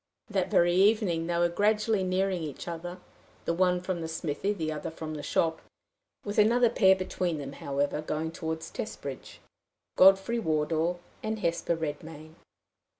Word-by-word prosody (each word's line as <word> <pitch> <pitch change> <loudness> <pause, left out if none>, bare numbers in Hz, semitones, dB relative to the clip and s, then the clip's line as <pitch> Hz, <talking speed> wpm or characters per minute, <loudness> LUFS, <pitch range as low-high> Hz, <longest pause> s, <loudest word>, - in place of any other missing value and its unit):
That 190 -3 0
very 175 0 +4
evening 190 -4 +3
they 170 -1 0
were 175 0 +4
gradually 210 +3 +1
nearing 185 0 0
each 150 0 -6
other 175 +1 -5 0.5
the - - +1
one 180 +1 +2
from 180 -1 -3
the 160 - -3
smithy, 160 +4 -2
the 160 -6 -2
other 150 - -4
from 160 -1 -6
the 150 - -5
shop 160 +2 0 0.6
with 205 +1 -1
another 235 +2 +5
pair 190 -5 +5
between 180 -3 -2
them, 140 -1 -6
however, 140 +1 -2
going 155 +1 -3
toward 160 -1 -4
Testbridge 140 -5 -7 0.6
Godfrey 195 +5 +6
Wardour 160 0 0 0.2
and 220 0 -2
Hesper 170 -1 0
Redmain. 155 0 -6
170 Hz, 150 wpm, -29 LUFS, 160-190 Hz, 0.6 s, Godfrey